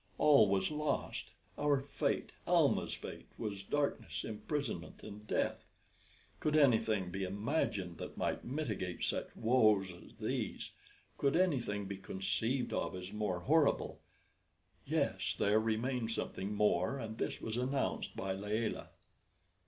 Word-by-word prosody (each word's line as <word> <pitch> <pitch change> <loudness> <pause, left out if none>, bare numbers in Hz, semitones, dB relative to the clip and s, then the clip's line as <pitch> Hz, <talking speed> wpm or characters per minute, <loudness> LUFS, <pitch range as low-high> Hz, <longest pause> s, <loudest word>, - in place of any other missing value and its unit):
All 150 -6 +7
was 100 +8 +2
lost! 150 0 -1 0.3
Our 145 -1 +3
fate 140 - -1 0.2
Almah's - - +3
fate - - -8
was 100 -3 -3
darkness, 145 +8 -1
imprisonment, 110 - -4
and 105 0 -9
death. - - 0 0.8
Could 155 0 +1
anything 110 -9 +4
be 95 +1 -2
imagined 100 - -1
that - - -7
might - - -1
mitigate 110 - -3
such - - 0
woes 110 -6 +4
as 90 - -14
these? - - -2 0.5
Could 140 - +3
anything 125 - +1
be 100 0 -4
conceived 110 +7 -1
of - - -1
as 90 +2 -6
more 105 -5 -1
horrible? 155 - +2 0.9
Yes; - - +1
there 105 +2 +4
remained 115 +2 0
something 100 -3 -3
more, 105 +3 +2
and 110 -3 -6
this - - -1
was 110 - -3
announced 130 +3 -1
by 95 0 -2
Layelah. 105 +3 -2
110 Hz, 130 wpm, -35 LUFS, 100-135 Hz, 0.9 s, All